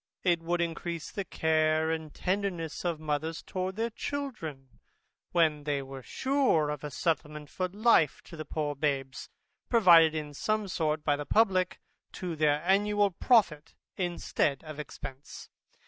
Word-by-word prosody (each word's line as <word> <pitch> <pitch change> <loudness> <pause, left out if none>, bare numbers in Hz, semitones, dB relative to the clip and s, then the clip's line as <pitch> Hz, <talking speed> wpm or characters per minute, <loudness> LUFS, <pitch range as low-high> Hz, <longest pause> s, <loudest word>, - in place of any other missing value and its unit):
It 175 -3 +2
would 170 +1 -1
encrease 170 -1 -3
the 200 - -3
care 160 -1 +1
and 160 -2 -4
tenderness 180 -4 -2
of 170 -3 -1
mothers 155 +1 -3
towards 185 +1 -4
their 230 +1 -1
children, 160 - -6 0.5
when 155 -4 +2
they 145 -2 -1
were 135 0 -9
sure 260 - +1
of 150 -1 -6
a 150 - -4
settlement 150 0 -2
for 185 - -1
life 200 - +3
to - - -12
the 155 - -5
poor 150 -2 -3
babes, 140 -2 -2 0.4
provided 170 -8 +6
in 150 -1 -4
some 215 +7 -1
sort 155 -4 -1
by 145 -1 +2
the 145 - -6
publick, 190 -5 +2 0.3
to 180 -3 -4
their 150 0 +2
annual 205 +1 +3
profit 180 - +2 0.2
instead 170 -5 -1
of 155 -2 -8
expence. 140 -2 -9
160 Hz, 145 wpm, -29 LUFS, 150-185 Hz, 0.5 s, provided